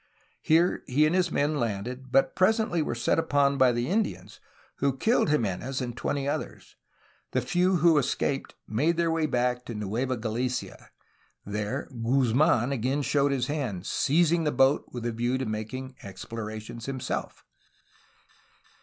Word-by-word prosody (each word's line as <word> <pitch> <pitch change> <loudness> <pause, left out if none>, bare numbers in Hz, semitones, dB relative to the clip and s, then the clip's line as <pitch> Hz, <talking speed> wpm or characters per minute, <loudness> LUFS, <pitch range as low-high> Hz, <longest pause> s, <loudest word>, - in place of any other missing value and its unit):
Here, 165 +3 +3
he 145 +4 +3
and 155 - +1
his 180 -2 +2
men 145 +1 +1
landed, 120 +3 -4
but 135 +1 +3
presently 215 -2 +2
were 135 - -2
set 120 - +1
upon 140 -3 +2
by 130 -1 +6
the 120 0 -1
Indians, 210 +4 -2 0.4
who 135 -1 0
killed 225 - +2
Jimenez 130 -1 -1
and 120 -2 -4
twenty 140 +2 -2
others. 145 - -5 0.6
The 130 - +2
few 180 +8 +2
who 165 -2 +5
escaped 135 +1 -2
made 155 +10 +1
their 170 -1 +2
way 160 -1 +1
back 125 -2 0
to 115 - -6
Nueva 115 +5 -2
Gali 115 +3 -1
cia. 125 -1 -6 0.6
There 105 +6 -3
Guzmdn 125 +2 +2
again 135 +3 -1
showed 140 0 +2
his 130 -3 0
hand, 125 - -3
seizing 165 +6 +2
the 150 - +1
boat 135 +2 +3
with 120 -2 -6
a 120 - 0
view 120 +3 -1
to 130 - -2
making 120 +5 -5
explorations 110 +3 -7
himself. 130 -2 -4
130 Hz, 155 wpm, -27 LUFS, 120-150 Hz, 0.6 s, by